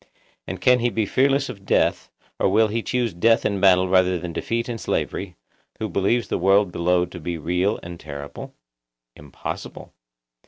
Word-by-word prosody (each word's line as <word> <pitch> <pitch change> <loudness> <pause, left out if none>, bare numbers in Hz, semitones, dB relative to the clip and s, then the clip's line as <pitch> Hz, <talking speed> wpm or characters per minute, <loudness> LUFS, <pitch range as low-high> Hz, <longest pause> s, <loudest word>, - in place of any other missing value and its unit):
And - - -5
can 125 0 +4
he 120 +1 +1
be 110 -2 -1
fearless 135 +5 +2
of 100 -6 -9
death, - - +1 0.3
or - - +3
will 110 +3 +3
he 115 +2 -1
choose 120 -2 -1
death 115 +7 +3
in 100 -2 0
battle 95 -1 +5
rather 90 -1 +3
than 85 0 -6
defeat 115 +6 -2
and 115 -2 -5
slavery, 90 -2 -3 0.4
who 110 - -3
believes 105 +4 0
the - - -2
world 95 +1 +3
below 90 +1 +1
to 90 0 -10
be 85 +1 -4
real 90 +6 0
and 85 0 -8
terrible? 70 -1 -8 0.6
Impossible. 75 -2 -8
95 Hz, 170 wpm, -23 LUFS, 90-115 Hz, 0.6 s, battle